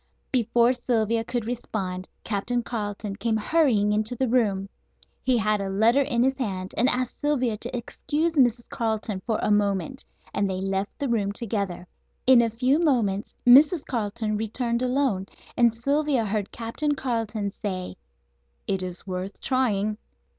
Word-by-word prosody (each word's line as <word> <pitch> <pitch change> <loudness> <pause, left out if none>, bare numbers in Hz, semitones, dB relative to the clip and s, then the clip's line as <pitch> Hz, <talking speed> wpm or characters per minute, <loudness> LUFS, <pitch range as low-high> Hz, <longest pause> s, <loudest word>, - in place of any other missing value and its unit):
Before 235 0 +3
Sylvia 230 -2 0
could 240 -1 -3
respond 195 -6 -4
Captain 230 +3 -1
Carleton 205 -3 -4
came 225 0 0
hurrying 220 -5 +2
into 215 +3 0
the 260 +2 0
room. 210 -5 +1 0.6
He 255 -1 +3
had 215 -1 +1
a 195 - -3
letter 225 +7 +4
in 250 -4 +1
his 265 +1 +1
hand, 190 -6 -3
and 245 - +4
asked 250 -1 -1
Sylvia 255 -6 +1
to 240 +3 -4
excuse 305 +7 -2
Mrs. 245 -5 +2
Carleton 220 -4 -2
for 220 -2 +1
a - - +2
moment, 205 +5 0 0.3
and 200 -1 0
they 185 -1 -2
left 195 +1 -2
the 280 - -2
room 210 -5 0
together. 200 -5 -3 0.4
In 255 -2 +7
a 230 - +2
few 255 +6 +2
moments 230 - +1
Mrs. 285 +6 +7
Carleton 215 -2 -2
returned 235 +2 -1
alone, 250 -7 0 0.3
and 235 -1 +5
Sylvia 275 +1 +1
heard 205 -1 -2
Captain 280 +6 -2
Carleton 225 -6 -2
say: 185 - -5 0.7
"It 195 -1 0
is 180 -1 -6
worth 185 +1 -5
trying." 215 -5 0
225 Hz, 155 wpm, -25 LUFS, 205-250 Hz, 0.7 s, In